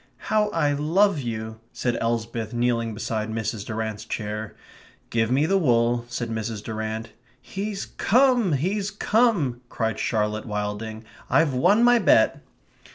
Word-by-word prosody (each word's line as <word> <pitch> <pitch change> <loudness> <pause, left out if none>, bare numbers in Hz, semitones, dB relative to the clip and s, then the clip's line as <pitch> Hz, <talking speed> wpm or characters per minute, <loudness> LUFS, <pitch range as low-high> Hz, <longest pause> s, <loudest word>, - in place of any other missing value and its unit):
"How 215 -1 +3
I 155 -6 +1
love 165 +5 +2
you!" 110 -3 -5
said 120 -2 -1
Elsbeth, 115 0 -2
kneeling 115 -2 0
beside 110 0 -3
Mrs. 110 -1 -3
Durrant's 110 -1 -4
chair. 105 -1 -5 0.6
"Give 115 -1 +1
me 135 +4 +3
the 195 +4 +2
wool," 120 -5 +2
said 120 -1 -4
Mrs. 110 -1 -4
Durrant. 110 +1 -4 0.3
"He's 200 0 -5
come 245 - +3
he's 190 +8 0
come!" 205 - +1
cried 110 -1 -2
Charlotte 105 -1 -1
Wilding. 105 +1 -4 0.3
"I've 160 -4 +3
won 185 - +4
my 245 0 +6
bet!" - - +4
120 Hz, 135 wpm, -24 LUFS, 110-175 Hz, 0.6 s, my